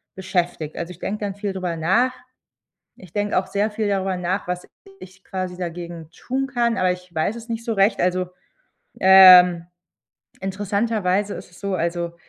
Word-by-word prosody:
beschäftigt. 175 -5 -2
Also, 170 +1 -5
ich 180 - -13
denke 210 +2 -4
dann 195 -1 -4
viel 205 -1 -4
darüber 180 -3 -3
nach. 205 +11 +2 0.8
Ich 180 -3 -16
denke 205 -1 0
auch 190 0 0
sehr 205 +2 -1
viel 215 0 -2
darüber 190 -2 -1
nach, 180 +2 -2
was 180 0 -4 0.3
ich 190 +1 -14
quasi 185 -1 -5
dagegen 170 -2 -6
tun 265 +8 -3
kann, 240 -3 0
aber 185 -1 +2
ich 180 -1 -8
weiß 160 +8 -1
es 235 0 -10
nicht 230 0 -4
so 230 - -1
recht. 195 +1 +2
Also, 180 0 0 0.7
ähm, 180 -2 +8 0.8
interessanterweise 200 0 -1
ist - - -10
es 180 - -17
so 200 -1 -3
also, 170 0 -2
185 Hz, 170 wpm, -22 LUFS, 180-205 Hz, 0.8 s, ähm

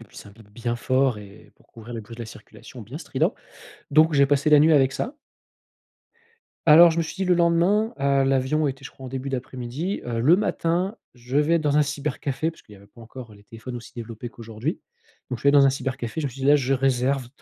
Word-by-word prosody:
et 115 - -12
puis - - -20
c'est 100 - -11
un - - -14
bip 110 -1 -18
bien 120 +2 -4
fort, 130 -1 +1
et 100 0 -14
pour - - -27
couvrir 115 +1 -12
le 115 - -5
bruit 110 +2 -12
de - - -10
la - - -8
circulation - - -13
bien - - -9
strident. - - -1 0.6
Donc 155 +3 +5
j'ai 140 -1 +4
passé 145 +2 +1
la 150 - +7
nuit 160 +1 +5
avec 135 -2 +3
ça. 255 - -4 1.5
Alors 165 +2 +8
je 165 - -3
me 165 - +2
suis 160 - -7
dit, 190 - -1
le 180 - +3
lendemain- 175 +6 +2
heu, 140 -1 +2
l'avion 135 +3 +1
était 135 0 -7
je - - -8
crois 130 - -12
en - - -6
début 135 +1 -5
d'après-midi- 130 +7 -4
heu: 115 -1 -3
«Le 160 +9 +5
matin 185 0 -1 0.2
je 125 +3 -5
vais 165 +3 +3
dans 150 -2 0
un - - +5
cybercafé» 145 +1 -3
parce 165 - -18
qu'il 105 - -16
y - - -14
avait 100 +1 -18
pas 115 +3 -19
encore 115 0 -11
les 100 - -18
téléphones 120 +2 -9
aussi 115 -2 -11
développés 115 0 -7
qu'aujourd'hui. 115 - -6 0.5
Donc 125 - -3
je - - -15
suis - - -2
allé 140 - +5
dans 140 -1 +7
un - - +4
cybercafé, 130 +1 -4
je 145 - -1
me 135 - -5
suis 135 - -12
dit: - - 0
«Là, 145 +1 +6
je 135 -1 0
réserve 130 -1 0
135 Hz, 250 wpm, -24 LUFS, 120-155 Hz, 1.5 s, Alors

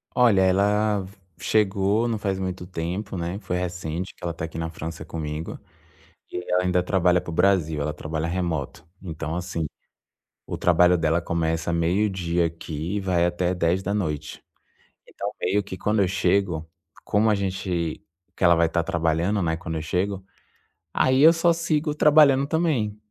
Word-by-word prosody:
Olha, 115 -6 +5
ela 100 +1 +2 0.3
chegou 105 +1 +1
não 115 -2 -1
faz 95 -2 -1
muito 95 -1 -4
tempo, 90 +3 -4
né. 85 +3 -3
Foi 90 -4 -3
recente 90 0 -4
que - - -22
ela 85 -1 -2
tá 80 - -4
aqui 80 0 -8
na 80 - -2
França 80 0 -7
comigo 80 0 -5 0.7
e 90 - -4
ela 90 0 +3
ainda 90 -1 +2
trabalha 90 -1 +2
pro 85 - -7
Brasil, 80 -4 +2
ela 75 +1 -2
trabalha 80 +1 -3
remoto. 85 -6 -3 0.2
Então 80 -2 -5
assim, 85 -2 -3 0.8
o - - -5
trabalho 90 +1 +4
dela 80 +1 +1
começa 80 0 -1
meio-dia 85 0 +1
aqui 80 +2 -5
e - - 0
vai 90 -3 +1
até 90 +1 0
22h. 90 -3 -1 0.7
Então - - -5
meio 100 +3 +1
que 95 -1 -8
quando 105 +2 +1
eu 90 - +2
chego, 90 -4 0 0.4
como 110 +2 +2
a - - +4
gente 90 -5 -2 0.3
que - - -1
ela 85 0 +7
vai 85 0 +3
tá 85 - 0
trabalhando, 85 +5 0
né, 80 -1 0
quando 80 -1 -5
eu - - -4
chego, 95 +4 -2 0.7
aí 130 +1 +3
eu 165 +2 +9
só 170 +1 +3
sigo 155 -2 0
trabalhando 145 -3 +5
também. 145 -10 0
90 Hz, 160 wpm, -24 LUFS, 85-100 Hz, 0.8 s, eu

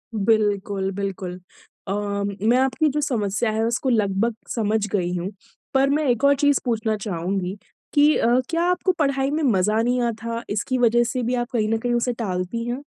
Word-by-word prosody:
बिल्कुल, 205 -2 +1
बिल्कुल। 190 -2 -4 0.5
अ, 195 - -1 0.5
मैं 245 - +5
आपकी 265 +4 +2
जो 300 +2 -1
समस्या 220 -5 0
है 220 +1 0
उसको 245 +3 0
लगभग 215 0 +1 0.2
समझ 215 -2 +1
गयी 180 -3 0
हूँ। 180 +2 -3 0.4
पर 270 +1 +3
मैं 300 +2 +1
एक 245 +1 +1
और 280 0 +6
चीज़ 285 0 +3
पूछना 220 -2 0
चाहूँगी 190 0 -3 0.4
कि 295 +1 +5
अ, - - +1 0.2
क्या 335 0 0
आपको 360 +1 +2
पढ़ाई 275 -1 +1
में 310 +1 -1
मज़ा 215 -3 +2
नहीं 245 +2 +1
आता 230 0 -2
इसकी 220 +5 -1
वजह 240 -1 +4
से 250 +1 -2
भी 245 +2 0
आप 240 +1 -2
कहीं 215 -3 +1
न 225 - +2
कहीं 240 +2 -1
उसे 240 +1 +1
टालती 200 0 -3
हैं? 250 +4 -3
230 Hz, 185 wpm, -23 LUFS, 205-260 Hz, 0.5 s, और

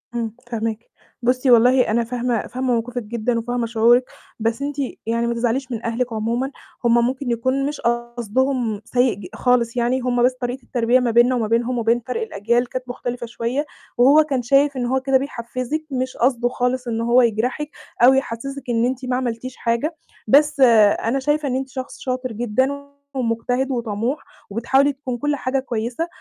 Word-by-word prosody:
إمم، 225 -2 -2 0.2
فاهماكِ. 225 0 -3 0.3
بُصي، 255 +1 +2
والله 250 +2 +5
أنا 235 +1 +2
فاهمة 240 -1 -2
فاهمة 255 +1 -1
موقفِك 240 +1 -2
جدًا 230 +2 -1
وفاهمة 240 0 -2
شعورِك، 235 +2 +4 0.4
بس 225 +4 -1
أنتِ 285 0 -3 0.3
يعني 230 +1 0
ما 235 - 0
تزعليش 245 +3 -1
من 225 -1 -4
أهلِك 235 +1 -1
عمومًا، 235 +5 -1 0.3
هُم 235 - +4
ممكن 255 0 -2
يكون 260 +4 0
مش 295 0 -4
قصدهم 240 -1 -1
سيء 245 -2 +2
ج 190 -3 -9
خالص 245 -1 +1
يعني، 245 +2 +1
هُم 245 -1 +1
بس 255 +1 +4
طريقة 245 +1 -3
التربية 240 +1 +2
ما 240 -2 0
بيننا 240 +2 +4
وما 225 -3 0
بينهم 240 +2 +1
وبين 230 +1 +2
فَرْق 255 - -2
الأجيال 240 - 0
كانت 255 -1 -5
مختلفة 245 -1 -4
شوية 240 +5 -2 0.3
وهو 280 +5 +6
كان 270 -4 -1
شايف 275 +3 +3
إن 245 - -1
هو 265 +2 +1
كده 270 -1 +3
بيحفّزِك، 255 +3 -4
مش 255 0 -2
قصده 245 -1 +2
خالص 250 0 -1
إن 230 -1 -1
هو 240 +2 +4
يجرحِك 245 +6 0 0.3
أو 255 +2 +8
يحسسِك 270 +1 -3
إن 230 0 +2
أنتِ 255 0 -2
ما 250 0 0
عملتيش 250 0 -3
حاجة. 235 +8 -1 0.3
بس 290 +4 +4 0.4
أنا 255 +4 +1
شايفة 295 +1 0
إن 255 - -1
أنتِ 265 0 -3
شخص 260 0 -7
شاطر 255 -1 -3
جدًا 260 +6 -1 0.3
ومجتهد 245 +2 -1
وطموح، 235 +3 -2 0.3
وبتحاولي 270 +6 +2
تكون 260 -3 -5
كل 295 +3 0
حاجة 265 0 -1
كويسة، 240 +5 -3
245 Hz, 175 wpm, -21 LUFS, 235-260 Hz, 0.4 s, أو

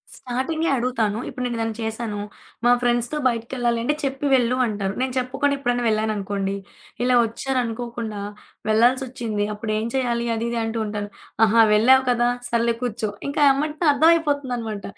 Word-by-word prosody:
స్టార్టింగే 265 +7 -2
అడుగుతాను. 235 -4 0
ఇప్పుడు 255 -1 -5
నేనేదైనా 225 -2 -2
చేశాను. 220 -1 -3 0.5
మా 245 - +6
ఫ్రెండ్స్‌తో 240 +3 +1
బయటికేళ్ళాలంటే 235 +1 0
చెప్పి 275 +1 -2
వెళ్ళు 245 0 +2
అంటారు. 205 -3 -2
నేను 260 -1 -1
చెప్పుకుండా 275 +3 0
ఎప్పుడైనా 245 -2 -1
వెళ్ళాననుకోండి. 205 -2 -1 0.5
ఇలా 250 0 +3
ఒచ్చారనుకోకుండా 235 -3 -3 0.5
వెళ్ళాల్సి‌సోచ్చింది. 235 -2 +1
అప్పుడేం 215 +1 -2
చేయాలి 235 -2 0
అదిది 235 +1 -2
అంటూంటాను. 215 -2 -3 0.4
అహా! 225 +2 +5
వెళ్ళావు 260 +5 +5
కదా! 240 0 +2 0.2
సర్లే 235 0 +1
కూర్చో. 225 -2 -2 0.2
ఇంకా 285 - -1
ఎమ్మటినే 300 +3 -1
అర్థమైపోతుందనమాట. 280 -9 +1
235 Hz, 120 wpm, -23 LUFS, 220-260 Hz, 0.5 s, మా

